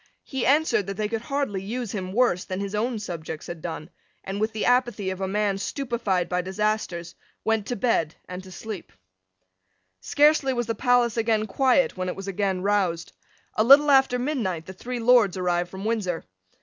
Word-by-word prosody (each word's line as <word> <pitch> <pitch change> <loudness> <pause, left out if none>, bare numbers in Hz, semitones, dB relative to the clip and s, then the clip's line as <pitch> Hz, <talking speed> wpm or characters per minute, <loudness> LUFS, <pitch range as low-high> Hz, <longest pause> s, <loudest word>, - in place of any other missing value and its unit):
He 265 -3 -2
answered 285 - +3
that 195 -1 -4
they 215 -1 0
could 225 +1 -3
hardly 270 -6 -2
use 230 +2 -4
him 185 -3 -4
worse 200 -5 +2
than 185 0 -5
his 200 0 -4
own 230 +3 -1
subjects 165 -6 -6
had 170 -2 -7
done, 160 -2 -6 0.3
and, 195 +2 -4
with 220 +1 +1
the 220 - -2
apathy 240 -6 +2
of 190 +1 -6
a 190 - 0
man 200 0 0
stupified 230 -7 -1
by 180 0 0
disasters, 190 -3 -2 0.3
went 225 -2 +1
to 245 - -2
bed 195 -9 +1
and 180 +1 -6
to 185 - -12
sleep. 210 +1 -7 1.1
Scarcely 290 - +3
was 240 -1 -1
the 230 - -1
palace 245 0 +2
again 220 -1 +1
quiet 260 +3 +2
when 185 0 -2
it - - -4
was 195 0 -8
again 195 -1 -1
roused. 190 -5 0 0.4
A 215 - +2
little 285 +4 +7
after 265 -2 +5
midnight 235 - -2
the 190 - -8
three 245 +6 -5
Lords 230 -5 +4
arrived 175 -1 0
from 190 +2 -7
Windsor. 205 -7 -1
210 Hz, 190 wpm, -25 LUFS, 185-240 Hz, 1.1 s, little